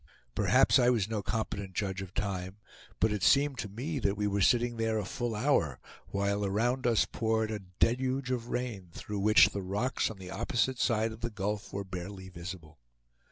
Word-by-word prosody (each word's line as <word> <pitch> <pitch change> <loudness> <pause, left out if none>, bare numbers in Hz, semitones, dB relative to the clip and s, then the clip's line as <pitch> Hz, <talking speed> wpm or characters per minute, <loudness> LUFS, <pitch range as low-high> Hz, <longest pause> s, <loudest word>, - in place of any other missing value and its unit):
Perhaps - - +4
I 125 - +5
was 115 -5 +2
no 110 -2 -2
competent 100 -2 -3
judge 95 -2 -2
of 95 -1 -9
time, 95 -1 -3 0.4
but 110 - +3
it 105 -2 -2
seemed 140 -2 +4
to 110 - -3
me 135 +9 -3
that 100 -4 0
we 105 - 0
were 100 0 0
sitting 120 +2 +3
there 115 -1 0
a 105 - -2
full 120 +3 -3
hour, 105 - +1 0.3
while 100 +1 0
around 120 +6 +1
us 115 -3 +4
poured 110 -1 0
a 105 - -3 0.2
deluge 130 +2 +1
of 120 -2 -2
rain, 115 -8 -3
through 105 -1 -5
which 105 +2 +6
the 100 - -4
rocks 100 +8 -1
on 110 - -8
the 95 -1 -9
opposite 120 +5 0
side 110 -1 +2
of 110 - -10
the 120 - -1
gulf 105 -1 -3
were 100 - -3
barely 95 +1 -7
visible. 85 -4 -9
105 Hz, 195 wpm, -31 LUFS, 95-120 Hz, 0.4 s, which